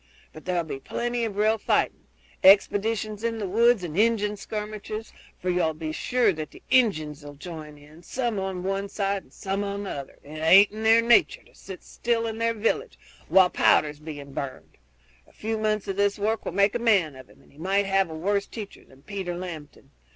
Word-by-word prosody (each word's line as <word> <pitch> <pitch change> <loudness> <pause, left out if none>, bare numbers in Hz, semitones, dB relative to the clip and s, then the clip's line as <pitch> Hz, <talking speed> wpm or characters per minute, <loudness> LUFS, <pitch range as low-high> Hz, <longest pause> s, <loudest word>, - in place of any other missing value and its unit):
But 155 - -12
there 180 -1 0
'll 170 - -2
be 140 -3 -6
plenty 240 - -2
of 205 -3 -5
real 215 +1 +2
fighting - - 0 0.4
expeditions 210 +2 +4
in 230 -1 -1
the 205 -3 -3
woods 230 +1 +3
and 160 -3 -5
Injun 210 0 +2
skirmishes, 215 +1 -6 0.3
for 185 - -1
you'll 170 -3 +1
be 155 0 -4
sure 235 +4 +1
that 155 -2 -6
the - - -16
Injuns'll 155 - +1
join 155 -2 -9
in, 150 +3 -16
some 235 +2 -2
on 190 -1 -4
one 195 +1 -2
side 200 -1 -1
and - - -25
some 195 +1 -3
on 200 0 -4
the 195 - -5
other; 140 -1 -7
it 155 +2 -9
aint 190 +6 +7
in 215 +1 -7
their 225 +1 +5
nature 235 -1 +4
to - - -24
sit 190 -1 -10
still 235 -1 -1
in 225 0 -4
their 230 0 +1
villages 230 - -1 0.3
while 185 -1 +5
powder's 150 -1 +3
being 145 -3 -9
burned. 135 -2 -7 0.5
A - - -22
few 220 0 -3
months 215 -1 0
of 195 -1 -3
this 200 0 +2
work 215 +2 -1
will - - -2
make 200 0 +3
a 240 - -1
man 195 - +2
of 130 -1 -13
him, - - -20
and - - -23
he 140 - -20
might 195 +4 +1
have 195 -2 +2
a 160 - -7
worse 200 +5 0
teacher 210 -3 -9
than 135 +1 -21
Peter 190 -3 -4
Lambton. 165 -5 -9
200 Hz, 210 wpm, -26 LUFS, 160-220 Hz, 0.5 s, aint